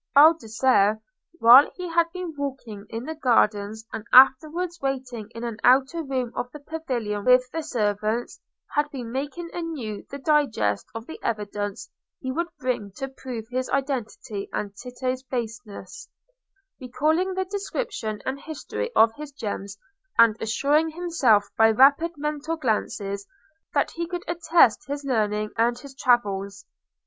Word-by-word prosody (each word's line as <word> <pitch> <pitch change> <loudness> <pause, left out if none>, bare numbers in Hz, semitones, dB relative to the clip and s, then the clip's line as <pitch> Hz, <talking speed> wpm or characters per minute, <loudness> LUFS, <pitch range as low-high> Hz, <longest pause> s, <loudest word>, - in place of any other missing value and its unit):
Baldassarre, 240 -7 +5 0.3
while 260 -4 +8
he 360 -1 -5
had 335 0 +1
been 365 -2 -5
walking 255 -8 -6
in 225 +1 -5
the 320 - -4
gardens 220 -6 +1
and 220 - -5
afterwards 310 +7 +5
waiting 255 -5 -3
in 230 - -6
an 235 -2 -4
outer 270 +6 +4
room 260 -5 -2
of 245 - -3
the 300 - -9
pavilion 255 -10 -4
with 250 +1 +5
the 325 - -3
servants, 215 -4 -1 0.3
had 295 0 +1
been 250 -6 -7
making 290 +6 -4
anew 295 -12 -5
the 280 - -6
digest 270 - +1
of 225 0 -6
the 320 - -9
evidence 205 -2 -3 0.3
he 260 - -4
would 340 +6 -1
bring 240 -6 -2
to 270 +6 -5
prove 255 -4 -7
his 255 +1 -2
identity 250 -7 -3
and 205 -1 -4
Tito's 255 +2 -4
baseness, 235 -4 -6 0.7
recalling 315 +9 0
the 375 0 -1
description 385 - -4
and 265 +1 -3
history 315 +10 -5
of 225 0 +5
his 300 -1 -8
gems, 205 -6 -5 0.4
and 230 -2 +6
assuring 285 +8 +2
himself 310 - +2
by 225 0 +6
rapid 280 +8 +4
mental 300 +2 -2
glances 205 -6 -2 0.5
that - - +2
he 340 0 -4
could 355 0 -5
attest 330 -5 +3
his 285 0 -4
learning 215 -4 0
and 235 +1 +2
his 280 0 -11
travels. 205 -7 0
255 Hz, 145 wpm, -25 LUFS, 220-300 Hz, 0.7 s, while